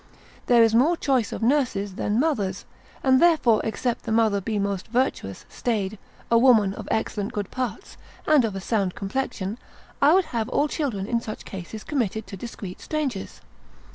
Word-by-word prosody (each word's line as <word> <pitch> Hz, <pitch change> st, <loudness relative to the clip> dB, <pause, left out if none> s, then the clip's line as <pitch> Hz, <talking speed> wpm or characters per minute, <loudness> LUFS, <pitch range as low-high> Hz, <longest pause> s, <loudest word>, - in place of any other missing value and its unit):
There 240 Hz, -2 st, +6 dB
is 225 Hz, -1 st, +3 dB
more 295 Hz, +9 st, +4 dB
choice 260 Hz, -8 st, +1 dB
of -, -, -4 dB
nurses 235 Hz, -7 st, +1 dB
than 205 Hz, +4 st, 0 dB
mothers; 210 Hz, -, 0 dB, 0.4 s
and 260 Hz, -1 st, +4 dB
therefore 310 Hz, -10 st, +4 dB
except 230 Hz, +2 st, -2 dB
the 225 Hz, -, -5 dB
mother 220 Hz, -3 st, +3 dB
be 215 Hz, +2 st, -2 dB
most 200 Hz, -2 st, -2 dB
virtuous, 235 Hz, -, -1 dB
staid, 215 Hz, -4 st, -2 dB, 0.3 s
a 230 Hz, -, +6 dB
woman 225 Hz, -6 st, +5 dB
of 205 Hz, 0 st, -8 dB
excellent 210 Hz, -2 st, -2 dB
good 205 Hz, -2 st, -4 dB
parts, 255 Hz, -, -4 dB, 0.3 s
and 305 Hz, -4 st, +5 dB
of 215 Hz, -4 st, -2 dB
a 195 Hz, -, -4 dB
sound 195 Hz, -2 st, 0 dB
complexion, 205 Hz, 0 st, -3 dB, 0.4 s
I 295 Hz, +5 st, +6 dB
would 380 Hz, -2 st, +3 dB
have 225 Hz, -2 st, -1 dB
all 295 Hz, -, +2 dB
children 255 Hz, -, -2 dB
in 230 Hz, +2 st, 0 dB
such 215 Hz, -2 st, -7 dB
cases 195 Hz, +3 st, -7 dB
committed 220 Hz, -7 st, -2 dB
to 195 Hz, -, -8 dB
discreet 195 Hz, -3 st, -8 dB
strangers. 280 Hz, -11 st, -3 dB
225 Hz, 170 wpm, -24 LUFS, 200-260 Hz, 0.4 s, There